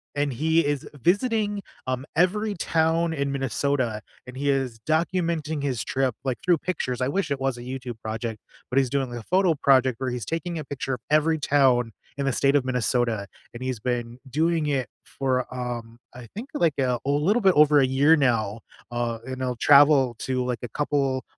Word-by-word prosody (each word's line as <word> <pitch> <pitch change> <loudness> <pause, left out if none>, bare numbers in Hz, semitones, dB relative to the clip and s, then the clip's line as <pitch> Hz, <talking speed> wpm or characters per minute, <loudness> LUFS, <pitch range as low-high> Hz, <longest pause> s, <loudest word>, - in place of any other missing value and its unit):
and 145 -1 0
he 160 +5 +2
is 145 -2 -1
visiting, 205 - +1 0.3
um, 130 +1 -2
every 205 +5 +1
town 165 0 +1
in 140 -2 -1
Minnesota, 130 -4 -1 0.3
and 125 - -9
he 140 +1 0
is 130 -5 -1
documenting 160 -2 0
his 130 -5 -1
trip, 130 -2 0
like, 130 -2 -1
through 175 -2 +4
pictures. 130 -8 -3
I 125 - +1
wish 190 0 -1
it 140 - -1
was 135 -2 -1
a - - -8
YouTube 125 -2 -6
project, 110 0 -4 0.3
but 130 - -2
he's 130 - +1
doing 135 -2 -1
like 120 - -6
a - - -16
photo 185 -3 +2
project 130 -3 +3
where 130 - -1
he's 120 -4 -4
taking 165 0 -3
a 150 - -6
picture 135 -2 -3
of - - -12
every 155 +1 +3
town 130 -5 +3 0.3
in 140 - -1
the 135 - +1
state 140 +3 +2
of 130 - -1
Minnesota, 120 -4 0 0.3
and 120 +2 -7
he's 130 -4 -3
been 120 0 -3
doing 160 +3 +1
it 135 -3 0 0.2
for, 130 -2 -1
um, 120 -2 -5
I 120 -2 -10
think 245 +6 -6
like, 165 - +1
uh, 125 -2 +1
a - - -1
little 170 +12 +2
bit 190 -1 +5
over 150 -1 +6
a 135 - +5
year 140 +5 +4
now, 115 -6 +1 0.3
uh, 120 -1 -2
and 130 0 -6
he'll 125 -1 -1
travel 140 -2 +5
to 130 -1 -1
like 125 -3 -2
a - - -3
couple, 135 -1 -1
135 Hz, 200 wpm, -25 LUFS, 125-155 Hz, 0.3 s, over